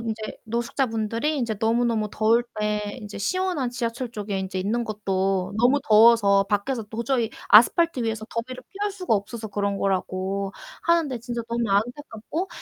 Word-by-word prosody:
인제 220 -1 -5
노숙자 235 +4 -1
분들이 230 +6 -1
인제 230 -4 -1
너무너무 225 -1 +1
더울 225 +3 +3 0.2
때 210 0 -2
인제 210 -2 -8
시원한 355 - -1
지하철 240 0 -3
쪽에 205 -3 -4
인제 190 0 -4
있는 220 +6 -1
것도 195 -2 -1
너무 250 +5 +4
더워서 215 -3 +6
밖에서 225 +5 -1
도저히 230 +2 -1 0.2
아스팔트 265 +7 +6
위에서 220 -1 -2
더위를 255 +2 -5
피할 410 +1 -2
수가 370 - -1
없어서 215 +2 -4
그런 200 -1 -1
거라고 195 0 -1 0.3
하는데 330 -7 +2
진짜 235 0 -4
너무 235 0 -1
안타깝고 245 - -2
225 Hz, 365 characters per minute, -24 LUFS, 205-245 Hz, 0.3 s, 더워서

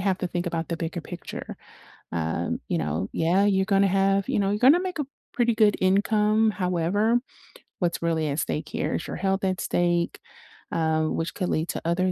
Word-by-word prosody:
have 190 -1 +1
to 180 - -2
think 175 0 -3
about 165 -1 -2
the 170 - -2
bigger 170 +1 -4
picture. 175 +2 -8 0.6
Um, 80 0 -2
you - - 0
know, 80 +5 -2
yeah, 175 +5 +2
you're 190 -2 +3
gonna 195 -1 +4
have 195 0 +2
you - - +1
know, 200 -1 +1
you're 205 - 0
gonna 275 +9 +6
make 365 -2 -4
a 295 - -1 0.3
pretty 240 -2 +2
good 215 -2 +4
income, 210 +3 +3
however, 200 +5 +1 0.6
what's 175 -2 -1
really 165 -2 0
at 140 +2 -1
stake 150 0 -2
here? - - -2
Is - - -4
your - - -5
health 195 +2 0
at 185 -1 0
stake, 175 -1 0 0.5
uh, 160 -1 +1
which 165 +1 -2
could 180 -3 -2
lead 160 +2 -1
to - - -3
other 185 +2 +1
185 Hz, 200 wpm, -25 LUFS, 165-205 Hz, 0.6 s, gonna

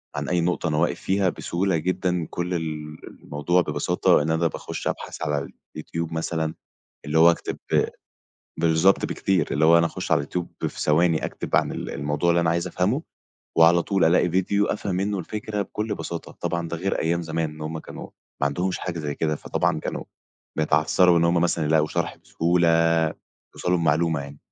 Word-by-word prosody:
عن - - -3
أي 90 -1 +2
نقطة 90 0 0
أنا 75 - 0
واقف 85 +2 +1
فيها 95 0 +1
بسهولة 90 +1 -1
جدًا. 90 +1 -1
كل 90 +1 -3
ال 75 -2 -4 0.3
الموضوع 80 +5 +1
ببساطة 75 -1 +2
إن 80 +2 0
أنا 80 +1 +2
باخش - - -5
أبحث - - -4
على 75 -3 -1 0.3
الYouTube 85 +1 -4
مثلًا 80 -1 -2 0.5
اللي 75 +2 +1
هو 85 +1 +8
أكتب 85 - -3 1.0
بالضبط، 80 +4 +3
بكتير 95 -6 0
اللي 75 +3 +2
هو 85 +1 +7
أنا 85 - +3
أخش - - -4
على 70 - +3
الYouTube 90 +2 -4
في - - -6
ثواني 80 +1 +2
أكتب - - -2
عن - - +2
ال - - -5
الموضوع 75 +4 0
اللي 85 0 +3
أنا 85 -1 +2
عايز 85 +2 0
أفهمه، 95 - 0 0.5
وعلى 85 +1 +6
طول 95 0 +1
ألاقي 85 +2 +4
ڤيديو 95 +3 +1
أفهم 100 -2 -3
منّه 100 +2 -1
الفكرة 105 +3 -3
بكل 105 +2 -3
بساطة. 85 -4 -6
طبعًا 85 -1 -2
ده 85 - -3
غير 95 +4 -1
أيام 85 +1 0
زمان، 80 -1 -2
إن 75 0 -12
هم 80 +1 -4
كانوا - - -9 0.3
ما 70 - +3
عندهمش 90 +6 -1
حاجة 90 -2 -4
زي 75 -2 -3
كده، 75 0 -1
فطبعًا - - -1
كانوا - - -4 0.5
بيتعثروا 80 +4 +4
إن 85 - +2
هم 85 +1 +3
مثلًا 85 -2 +1
يلاقوا 75 0 +3
شرح - - -2
بسهولة، 85 +1 +1 0.9
يوصلوا 90 0 0
لمعلومة 80 -1 +2
يعني. 70 +1 -9
85 Hz, 180 wpm, -24 LUFS, 80-90 Hz, 1.0 s, هو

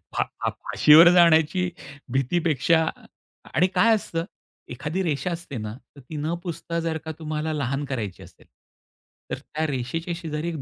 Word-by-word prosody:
फा - - +2
फा - - -4
फाशीवर 160 +3 +6
जाण्याची 170 +1 +4 0.4
भीतीपेक्षा 160 +3 +2 0.7
आणि 180 +4 +4
काय 225 0 +5
असतं 165 -5 -3 0.5
एखादी 150 +9 -3
रेषा 165 +1 -1
असते 165 -6 -6
ना, 110 -1 -5 0.2
तर 140 - -13
ती 135 +5 -10
न 155 +3 -2
पुसता 170 -1 -4
जर 165 -1 -2
का 160 - -3
तुम्हाला 155 0 -3
लहान 140 -1 -2
करायची 115 -9 -5
असेल. - - -18 0.8
तर - - -1
त्या 155 +1 -4
रेषेच्या 155 +6 -3
शेजारी 160 -1 -4
एक 160 -5 -5
160 Hz, 155 wpm, -24 LUFS, 140-170 Hz, 0.8 s, फाशीवर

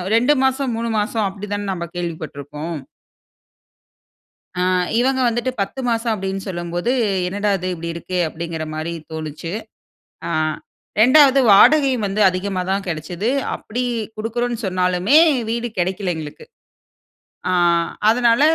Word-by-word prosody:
2 250 +6 +4
மாசம், 265 -2 +1
3 230 0 -2
மாசம் 215 +1 -1
அப்படி 200 +2 -7
தான, 205 0 -3
நம்ம 170 -1 -5
கேள்விப்பட்ருக்கோம். 155 -1 -5 1.8
ஆ, - - +1 0.4
இவங்க 260 +1 +1
வந்துட்டு 240 +2 0
10 230 +7 -3
மாசம் 230 0 0
அப்டினு 195 -1 -3
சொல்லம்போது, 175 +5 -2 0.3
என்னடா 205 +3 -1
இது 185 - -5
இப்படி 170 0 -5
இருக்கே? 180 +2 -4
அப்படிங்கிற 165 0 -5
மாரி 160 +2 -3 0.2
தோணுச்சு. 160 +2 -5 0.8
ஆ, - - -3 0.7
2வது 275 +2 +6
வாடகை 275 +6 +6
வந்து 200 +2 -1
அதிகமாதா 185 0 -2
கெடச்சது. 175 +6 -3 0.3
அப்படி 245 +4 -4 0.3
குடுக்குறோனு 235 +2 -2
சொன்னாலுமே, 185 +7 +2 0.3
வீடு 235 +1 -1
கிடைக்கல 185 0 -1
எங்களுக்கு. 155 - -8 1.1
ஆ, - - +1 0.6
அதனால 235 +1 +4
195 Hz, 115 wpm, -20 LUFS, 170-235 Hz, 1.8 s, 2வது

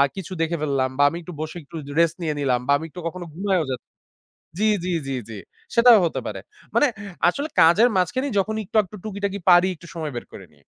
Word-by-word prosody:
কিছু 190 -2 -7
দেখে 165 +1 0
ফেললাম 135 -3 0
বা 145 - +4
আমি 165 - -6
একটু 175 +1 -9
বসে 155 +2 -5
একটু 145 - -14
যে - - -7
রেস্ট 170 -1 +3
নিয়ে 160 -2 -1
নিলাম 130 -3 +1
বা - - +3
আমি 160 - -7
একটু 180 - -10
কখনো 175 +1 -6
ঘুমাইও 190 0 0
যা - - 0 0.8
জ্বী, 215 +1 +3 0.2
জ্বী, 180 - -1
জ্বী, 135 -1 -2
জ্বী। 110 -2 -7 0.4
সেটাও 235 -1 +8
হতে 165 - -1
পারে। - - -5 0.3
মানে - - +5 0.4
আসলে 285 - -1
কাজের 185 +9 +6
মাঝখানে 245 +9 0
যখন 210 +3 0
একটু-আকটু 210 -1 0
টুকিটাকি 200 -1 -3
পারি 175 +1 +7
একটু 170 0 -15
সময় 155 -3 -4
বের 120 - -5
করেনি। 80 -7 -13
175 Hz, 205 wpm, -23 LUFS, 155-200 Hz, 0.8 s, সেটাও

